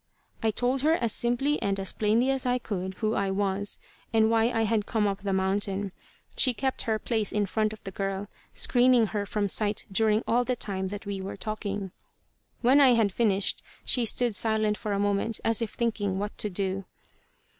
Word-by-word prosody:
I 225 - +2
told 245 +4 0
her 310 +3 +3
as 235 -9 +1
simply 255 +5 +1
and 195 -1 -1
as 195 - -3
plainly 225 +5 +2
as 270 -1 0
I 250 0 +2
could, 190 -5 -4
who 215 +1 -1
I 200 -3 0
was, 195 +1 0 0.3
and 220 0 +3
why 225 0 +3
I 225 -2 0
had 220 -1 0
come 220 -2 +1
up 195 -1 -1
the 200 0 -3
mountain. 195 +1 -1 0.4
She 255 -3 +3
kept 265 +1 0
her 220 - +2
place 220 -1 -1
in 210 -1 +1
front 215 +2 0
of 215 - -11
the 195 - -6
girl, 195 +1 -3 0.2
screening 245 -2 +4
her 205 -1 -2
from 205 0 -1
sight 210 +1 +1
during 215 +2 +2
all 245 +2 +3
the 250 0 -1
time 190 -4 -3
that 205 +2 -7
we 200 -1 -4
were 195 +1 -6
talking. 205 -2 -4 0.7
When 260 +4 +5
I 260 -3 +7
had 220 -3 +2
finished 200 -2 +1 0.2
she 245 -2 +3
stood 235 0 +3
silent 220 -1 +2
for 210 - -5
a - - 0
moment, 205 +2 0
as 225 +1 +1
if 230 - -3
thinking 210 -5 -1
what 205 +1 -4
to 210 - +1
do. 195 0 -2
215 Hz, 200 wpm, -27 LUFS, 200-230 Hz, 0.7 s, I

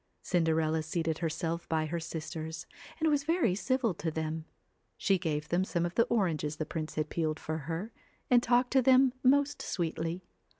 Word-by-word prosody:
Cinderella 160 -2 +1
seated 160 0 -2
herself 165 0 -2
by 160 -1 +1
her 170 +2 -2
sisters, 160 -1 -5 0.3
and 320 - +2
was 290 -2 +2
very 320 - +2
civil 240 +2 +1
to 165 0 -3
them. 160 0 -3 0.5
She 195 -2 +2
gave 150 -4 -2
them 175 +2 +2
some 175 -3 -1
of 175 - -3
the 230 - +4
28 235 -2 +1
oranges 155 -5 -1
the 155 - -3
prince 155 0 -5
had 155 - -1
peeled 155 -2 -1
for 160 0 -3
her, 180 +8 -3 0.3
and 245 -1 +5
talked 245 +1 +2
CINDER 265 -1 +5
to - - +8
them 260 0 +6
most 285 +2 +3
sweetly. 165 0 -2
170 Hz, 185 wpm, -31 LUFS, 160-235 Hz, 0.5 s, to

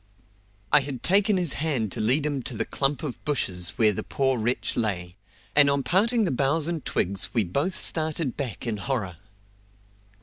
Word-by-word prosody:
I 150 - +7
had 135 -3 -6
taken 200 +2 +4
his 175 -6 +1
hand 135 -10 -1
to - - -4
lead 130 +7 +2
him 145 -3 -1
to 120 -1 -5
the - - -1
clump 135 -1 0
of 140 -6 -6
bushes 90 - -1
where 110 -3 +4
the - - -3
poor 135 -3 0
wretch 120 +3 -1
lay, 90 -6 -2 0.4
and 145 -1 +7
on 140 -1 0
parting 225 - +2
the 175 - -1
boughs 140 +4 +1
and 165 -5 -3
twigs 95 +5 -1
we 115 - +3
both 140 - -1
started 155 -3 0
back 125 -8 -5
in 115 -3 -2
horror. 100 -6 -3
135 Hz, 180 wpm, -25 LUFS, 110-155 Hz, 0.4 s, I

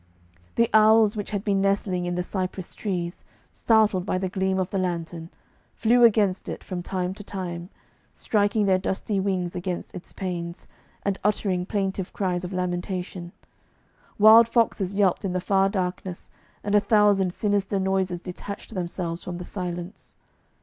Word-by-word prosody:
The 230 - +4
owls 215 0 +6
which 205 -2 -4
had 205 -2 -3
been 200 -2 +1
nestling 195 -2 0
in 175 - -2
the 180 - -1
cypress 185 -1 -4
trees, 175 -4 -4 0.3
startled 215 -5 +3
by 185 - -1
the 185 0 -2
gleam 190 0 0
of 185 -1 -1
the 195 - 0
lantern, 170 -2 -3 0.5
flew 240 +2 +4
against 205 -5 +3
it - - -6
from 180 -1 -5
time 180 0 -2
to 205 - -10
time, 180 -3 -5 0.4
striking 205 0 +1
their 190 -1 +3
dusty 195 +2 -2
wings 185 -2 -1
against 180 0 -4
its 180 - -9
panes, 175 -2 -5 0.4
and 200 -1 -1
uttering 190 -3 0
plaintive 195 -3 -2
cries 180 -3 -1
of 180 - -5
lamentation; 180 -1 -3 0.9
wild 220 +2 +8
foxes 220 -5 +1
yelped 195 -2 +2
in 190 -2 -2
the 185 - 0
far 195 +1 +2
darkness, 185 -2 -4 0.3
and 205 - -2
a 210 - +7
thousand 205 -3 +3
sinister 200 0 0
noises 190 -2 0
detached 195 +5 -8
themselves 175 -2 -3
from 175 -1 -5
the 180 - -7
silence. 175 -1 -6
190 Hz, 155 wpm, -25 LUFS, 180-205 Hz, 0.9 s, wild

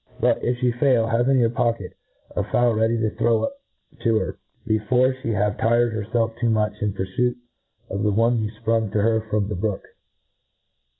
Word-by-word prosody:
But, 120 +1 +1
if 120 0 0
flie 125 -1 +2
foil, 130 -5 +3
have 115 +3 +1
in 135 - +4
your 115 -2 +3
pocket 115 -5 -1 0.4
a 105 - 0
fowl 120 +3 +2
ready 110 +1 +1
to 110 -1 0
throw 115 -1 +1
up 280 0 -4 0.4
to 115 -2 +2
her, - - -3 0.3
before 125 +4 +2
flie 115 - -2
have 105 0 0
tired 120 0 +2
hcrfclf 115 +1 -2
too 120 -1 +1
much 105 -1 +1
}n 105 -1 0
purfuit 120 +6 -1 0.5
of 100 - -4
the 105 -1 +2
one 115 +3 +2
you 105 - -2
fprung 115 -1 +1
to 105 - +2
her 110 0 +2
from 105 -1 0
the 105 - -3
brook. 100 +1 -2
115 Hz, 190 wpm, -23 LUFS, 105-120 Hz, 0.5 s, in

